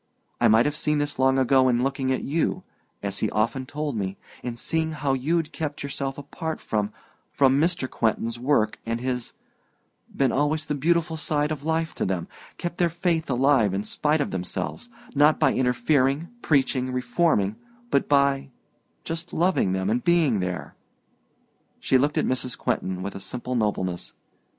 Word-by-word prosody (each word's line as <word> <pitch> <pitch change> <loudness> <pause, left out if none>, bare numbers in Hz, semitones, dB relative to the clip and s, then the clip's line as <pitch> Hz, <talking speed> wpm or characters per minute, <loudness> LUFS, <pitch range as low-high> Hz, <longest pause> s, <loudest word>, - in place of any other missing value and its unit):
I - - +5
might 110 +2 +5
have 150 0 0
seen 150 0 +1
this 145 -2 -1
long 130 0 +4
ago 130 0 +4
in 120 0 +2
looking 135 -1 0
at 130 - -1
you 155 +4 0 0.4
as 100 -1 -2
he 110 - 0
often 115 +5 -1
told 150 -2 -3
me 95 -2 -3 0.2
in 120 -1 -5
seeing 160 +5 -1
how 145 -3 0
you'd 155 +5 0
kept 150 -3 -4
yourself 140 -1 -3
apart 155 +3 -5
from 105 -1 -1 0.4
from 135 0 +4
Mr. 170 -5 +1
Quentin's 115 0 -1
work 120 -5 +1
and 115 +1 -2
his 125 -1 -3 0.8
been 135 -2 +2
always 150 +3 +1
the - - -2
beautiful 165 +3 +1
side 150 0 0
of 150 -3 -3
life 160 +1 0
to - - -3
them 90 -3 -1 0.3
kept 175 0 -5
their 175 -1 +3
faith 165 -1 -1
alive 125 -6 +3
in 100 - -1
spite 150 +7 +1
of - - -2
themselves 95 - -4 0.2
not 145 +2 +4
by - - +4
interfering, 135 +4 +1
preaching, 130 -3 +1
reforming, 125 - +1 0.4
but 140 - +2
by 140 -1 +3 0.5
just 165 +1 -4
loving 170 - +2
them 95 0 -1
and 115 +4 0
being 165 - +3
there 90 -1 -4 0.5
" - - -41
She 130 - +3
looked 145 +3 +1
at - - +2
Mrs. 125 -1 -2
Quentin 95 0 -2
with 100 - -4
a - - -7
simple 125 +5 -4
nobleness. 100 -6 -1
135 Hz, 170 wpm, -25 LUFS, 115-150 Hz, 0.8 s, I